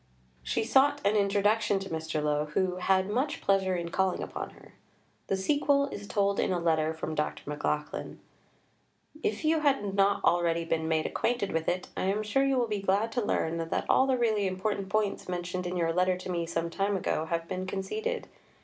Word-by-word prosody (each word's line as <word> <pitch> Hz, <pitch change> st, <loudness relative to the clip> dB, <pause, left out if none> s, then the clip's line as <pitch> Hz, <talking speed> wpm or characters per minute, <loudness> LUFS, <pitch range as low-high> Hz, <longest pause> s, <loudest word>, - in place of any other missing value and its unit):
She 65 Hz, -, -1 dB
sought 275 Hz, +5 st, +4 dB
an 205 Hz, +2 st, +3 dB
introduction 205 Hz, +1 st, +2 dB
to 195 Hz, 0 st, -5 dB
Mr. 160 Hz, -1 st, -2 dB
Lowe, 150 Hz, 0 st, +1 dB
who 185 Hz, -1 st, +1 dB
"had 190 Hz, +1 st, +2 dB
much 255 Hz, +8 st, -1 dB
pleasure 190 Hz, -1 st, +2 dB
in 170 Hz, -1 st, -3 dB
calling 190 Hz, +1 st, 0 dB
upon -, -, -5 dB
her." -, -, -17 dB, 0.5 s
The 195 Hz, -, 0 dB
sequel 280 Hz, +6 st, +2 dB
is 205 Hz, -5 st, -7 dB
told 200 Hz, -1 st, +1 dB
in -, -, +1 dB
a 180 Hz, -, +1 dB
letter 160 Hz, -2 st, +2 dB
from 160 Hz, 0 st, -4 dB
Dr. 150 Hz, -1 st, -2 dB
McLachlan: 150 Hz, +1 st, -3 dB, 1.0 s
"If 220 Hz, +2 st, -1 dB
you 320 Hz, +1 st, +3 dB
have 270 Hz, -10 st, +1 dB
not 200 Hz, 0 st, +2 dB
already 170 Hz, -1 st, +2 dB
been 160 Hz, -1 st, -1 dB
made 160 Hz, -1 st, +1 dB
acquainted 240 Hz, -5 st, -1 dB
with 160 Hz, 0 st, 0 dB
it, 180 Hz, +1 st, -2 dB
I -, -, -1 dB
am 200 Hz, +3 st, 0 dB
sure 215 Hz, +6 st, +1 dB
you 275 Hz, -1 st, +2 dB
will 240 Hz, -2 st, +2 dB
be 210 Hz, -2 st, -2 dB
glad 200 Hz, +4 st, +1 dB
to 245 Hz, -, 0 dB
learn 165 Hz, -4 st, 0 dB
that -, -, -1 dB
all 265 Hz, -, +4 dB
the 260 Hz, -1 st, +2 dB
really 215 Hz, -4 st, +2 dB
important 190 Hz, +1 st, -2 dB
points 210 Hz, -2 st, -1 dB
mentioned 180 Hz, 0 st, -3 dB
in 180 Hz, +1 st, -3 dB
your 165 Hz, -1 st, +1 dB
letter 180 Hz, +1 st, +2 dB
to 185 Hz, 0 st, -6 dB
me 170 Hz, -1 st, -1 dB
some 165 Hz, 0 st, -2 dB
time 195 Hz, +2 st, 0 dB
ago 160 Hz, -3 st, -1 dB
have 165 Hz, 0 st, -2 dB
been 185 Hz, +2 st, -4 dB
conceded. 435 Hz, -, -3 dB
190 Hz, 200 wpm, -29 LUFS, 170-215 Hz, 1.0 s, sought